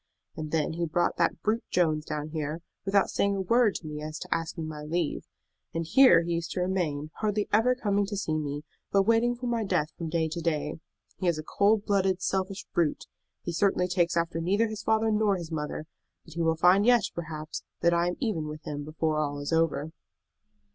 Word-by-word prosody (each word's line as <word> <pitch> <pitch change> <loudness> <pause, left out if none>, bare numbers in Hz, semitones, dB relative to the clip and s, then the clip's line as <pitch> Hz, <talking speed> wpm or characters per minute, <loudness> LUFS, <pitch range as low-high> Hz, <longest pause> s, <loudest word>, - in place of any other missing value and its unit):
And 155 -1 -5
then 155 0 0
he 170 +1 -1
brought 175 +2 0
that - - +1
brute 220 +2 +1
Jones 155 -4 +1
down 150 0 -4
here, 155 +1 -4 0.2
without 195 0 +2
saying 200 0 +1
a 195 - -1
word 230 +2 +3
to - - -6
me 150 -1 -5
as 155 +1 -5
to - - -2
asking 165 -1 -3
my 150 -1 -6
leave. 160 +1 -2 0.5
And 165 0 -1
here 260 -3 +6
he 170 0 -2
used 170 -1 -2
to - - -2
remain, 160 -5 -1
hardly 210 -1 0
ever 235 +4 +4
coming 205 -4 0
to 205 0 -4
see 160 -5 -1
me, 145 -1 -3 0.3
but 195 -1 +4
waiting 230 +3 +3
for 245 +1 -7
my 235 -2 0
death 180 -6 0
from 165 -2 -5
day 160 0 +1
to 170 +2 -4
day. 155 -2 -1 0.4
He 185 - -2
is 170 -2 +2
a 155 - -5
cold 205 +5 +2
blooded, 190 -2 +2
selfish 190 0 -2
brute. 165 -4 0 0.4
He 175 - -3
certainly 180 0 +2
takes 175 -2 +1
after 165 0 0
neither 200 +7 +2
his 215 -1 -5
father 220 0 +2
nor 210 -2 +3
his 170 -2 -7
mother. 150 0 -3 0.4
But 165 - -13
he 170 - -3
will 165 0 +2
find 180 +4 +5
yet, 240 -1 +5
perhaps, 155 -2 -6 0.2
that 170 0 +4
I 170 0 +2
am 180 - -1
even 195 - -1
with 155 +1 -7
him 145 -1 -5
before 155 +1 -1
all 145 -1 -1
is 145 +3 -3
over." 160 -1 +1
170 Hz, 215 wpm, -28 LUFS, 155-200 Hz, 0.5 s, here